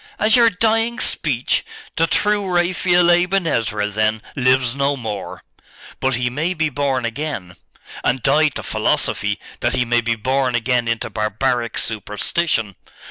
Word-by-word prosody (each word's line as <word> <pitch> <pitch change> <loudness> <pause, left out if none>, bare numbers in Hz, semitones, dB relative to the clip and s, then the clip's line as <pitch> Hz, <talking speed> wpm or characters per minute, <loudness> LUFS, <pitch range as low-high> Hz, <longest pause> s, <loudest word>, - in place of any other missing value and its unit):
'As 215 +1 +3
your 235 -2 +6
dying 225 +4 +1
speech? 130 - 0 0.3
The 165 - +2
true 205 +1 +1
Raphael 175 0 +3
Aben 180 +2 +2
Ezra, 105 -8 0
then, 110 +1 0
lives 130 -2 +2
no 140 +1 0
more!' 105 -5 -6 0.6
'But 130 -1 +1
he 125 +1 -1
may 155 +9 -2
be 160 -1 0
born 135 -3 -1
again.' 115 - -4 0.5
'And 125 -1 0
die 150 +3 +4
to 145 - -5
philosophy, - - 0 0.2
that - - 0
he 125 - +1
may 120 0 +2
be 115 0 0
born 130 +2 0
again 120 0 +1
into 115 0 -2
barbaric 115 +3 -1
superstition! 110 - -2
130 Hz, 145 wpm, -20 LUFS, 115-170 Hz, 0.6 s, your